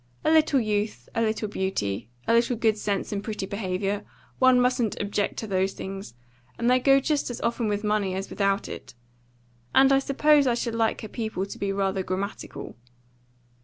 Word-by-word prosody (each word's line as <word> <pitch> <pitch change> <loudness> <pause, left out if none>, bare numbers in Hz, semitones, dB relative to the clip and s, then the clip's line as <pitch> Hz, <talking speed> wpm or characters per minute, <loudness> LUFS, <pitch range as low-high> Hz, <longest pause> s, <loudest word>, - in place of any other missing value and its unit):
"A - - +4
little 310 -3 +4
youth, 210 - -2
a 230 - 0
little 220 -1 0
beauty, 155 - -2 0.2
a - - +3
little 235 +1 +3
good 220 -2 +2
sense 205 -2 -2
and 200 -1 -3
pretty 210 -3 -4
behaviour 200 0 -2 0.4
one 260 -1 +6
mustn't 245 -3 +1
object 205 0 -1
to - - -3
those 190 -1 0
things; 195 - -7 0.4
and 235 - -1
they 250 +1 +5
go 275 +1 +5
just 290 0 0
as 245 - -5
often 235 -1 0
with 205 0 -1
money 210 -3 0
as 195 +1 -3
without 195 -1 0
it. - - -9 0.8
And 270 +1 +6
I 270 - +5
suppose 285 +1 +3
I 240 - +3
should 235 -1 -2
like 225 -1 0
her 215 - -6
people 220 -3 -3
to 200 - -9
be 200 -1 -1
rather 195 -1 0
grammatical." 190 +2 -5
215 Hz, 185 wpm, -26 LUFS, 195-245 Hz, 0.8 s, one